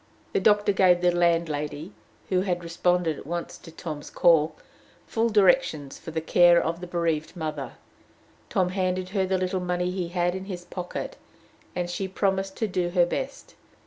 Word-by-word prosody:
The - - +3
doctor 205 +1 +4
gave 185 -2 +4
the 180 0 +4
landlady, 165 -1 0 0.4
who 185 -1 +2
had 180 -2 -1
responded 170 -1 0
at - - -12
once 170 +1 -4
to 165 - -12
Tom's 155 -3 -7
call, 160 -3 +4 0.5
full 230 0 0
directions 185 - +2
for - - -9
the 160 0 -2
care 175 +1 +5
of 170 +2 -2
the 180 - -6
bereaved 170 -2 -1
mother; 155 -6 -4 0.8
Tom 185 -2 +1
handed 185 -1 -1
her 190 -1 0
the 190 0 +1
little 185 +1 -1
money 180 0 -1
he 180 -2 -2
had 175 0 0
in 190 +1 -5
his 180 -3 -6
pocket, 180 -1 -6 0.6
and 180 -1 -1
she 185 +2 -3
promised 190 0 -1
to 220 - 0
do 180 -2 -1
her 175 -1 +4
best. 265 +10 -5
180 Hz, 175 wpm, -26 LUFS, 170-190 Hz, 0.8 s, care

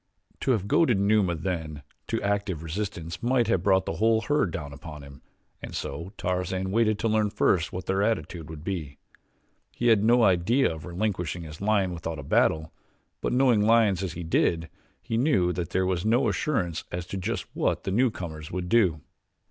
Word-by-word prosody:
To - - -2
have 100 -4 -1
goaded 120 -3 +3
Numa 100 -3 +3
then 80 -3 -4 0.3
into 115 - -1
active 100 -5 -1
resistance 85 0 -4
might 120 0 +2
have 95 -7 +2
brought 95 0 +3
the 80 - -3
whole 110 +2 +3
herd 145 -3 +1
down 75 -4 -6
upon 75 0 -9
him 70 0 -13 0.4
and - - -7
so 85 +7 -5
Tarzan 90 +1 -2
waited 110 0 +2
to 115 - -1
learn 110 -1 +2
first 90 -4 +1
what 90 0 -5
their 95 +1 0
attitude 95 -7 -2
would 80 -2 -8
be. 80 -7 -4 0.7
He 120 - 0
had 110 -3 +4
no 120 +2 +5
idea 95 +5 +3
of 80 -1 -9
relinquishing 90 -2 -2
his 75 +1 -10
lion 100 -3 +1
without 85 -1 -5
a - - -7
battle; 80 0 +1 0.5
but - - -1
knowing 125 -4 +4
lions 105 -4 +4
as 95 -4 -3
he 85 - -6
did, 85 0 +1 0.3
he 115 - -2
knew 100 - +2
that 85 -2 -3
there 95 0 +1
was 90 -2 -1
no 120 +3 +3
assurance 95 - -1
as 90 0 -4
to 95 - -5
just 95 0 -3
what - - 0
the 95 - -2
newcomers 90 -9 -1
would 90 0 -4
do. 90 -10 +3
95 Hz, 190 wpm, -26 LUFS, 85-110 Hz, 0.7 s, no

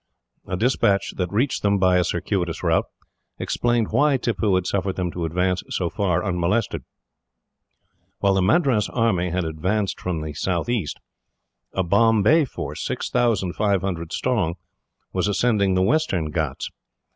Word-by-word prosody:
A 90 - -2
despatch 105 -3 +1
that 90 -2 -2
reached 120 +7 0
them, 100 0 +2
by 90 -1 +4
a - - +3
circuitous 85 -2 -2
route, - - +2 0.5
explained 120 -2 0
why 145 -1 +3
Tippoo 105 -5 0
had 90 -1 0
suffered 95 0 -1
them 90 -2 -2
to 85 -1 -3
advance 90 +3 0
so 85 -2 -1
far 100 -2 0
unmolested. 90 -1 0 1.4
While 100 -1 +2
the 95 - +2
Madras 125 - +2
army 100 -7 +1
had 90 +1 -1
advanced 90 +6 -1
from 85 -4 -2
the 75 -1 -5
southeast, 90 +4 -2 0.7
a 95 - 0
Bombay 115 - +4
force, - - -6
6,500 95 -6 0
strong, 105 -10 0 0.6
was - - 0
ascending 105 -2 +2
the 95 - +3
Western 95 - +1
Ghauts. 75 -4 -3
95 Hz, 135 wpm, -23 LUFS, 90-115 Hz, 1.4 s, by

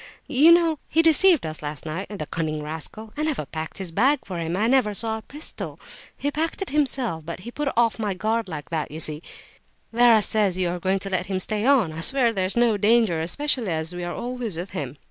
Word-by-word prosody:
You 295 +4 +5
know 335 -3 +4
he 325 - +3
deceived 330 - +5
us 155 -1 -5
last 150 +1 -6
night, 165 +5 -4
the 200 -7 -5
cunning 155 -1 -3
rascal. 160 +8 -7
I 300 - -3
never 305 - -1
packed 155 +4 -6
his 190 -3 -5
bag 260 - +3
for 180 -3 -5
him, 165 +1 -2
and - - -2
I 210 - +1
never 245 -5 +2
saw 220 +1 0
his 220 - -12
pistol. 300 +2 -8 0.4
He 285 - -2
packed 320 +3 -2
it 385 - -7
himself. 260 - 0
But 170 +3 -7
he 235 - -8
put 295 +3 -3
me - - -1
off 235 -1 +2
my 205 -3 -1
guard 220 +3 -1
like 155 -1 -7
that, 160 -2 -2
you 155 - -7
see. 155 -1 -2 0.7
Vera 230 -2 +5
says 200 -4 +1
you 180 -2 +1
are 175 +1 -3
going 190 +2 +1
to 195 0 -5
let 180 -1 -1
him 190 -1 -1
stay 215 +4 0
on; 240 - +3
I 160 - -6
swear 240 +5 +3
there's 190 +1 -1
no 235 -3 +3
danger, 210 -5 +3
especially 245 - 0
as 160 +1 -1
we 175 0 -5
are 175 0 -4
always 240 -6 -3
with 180 +3 -5
him." 145 -7 -5
205 Hz, 240 wpm, -24 LUFS, 165-250 Hz, 0.7 s, You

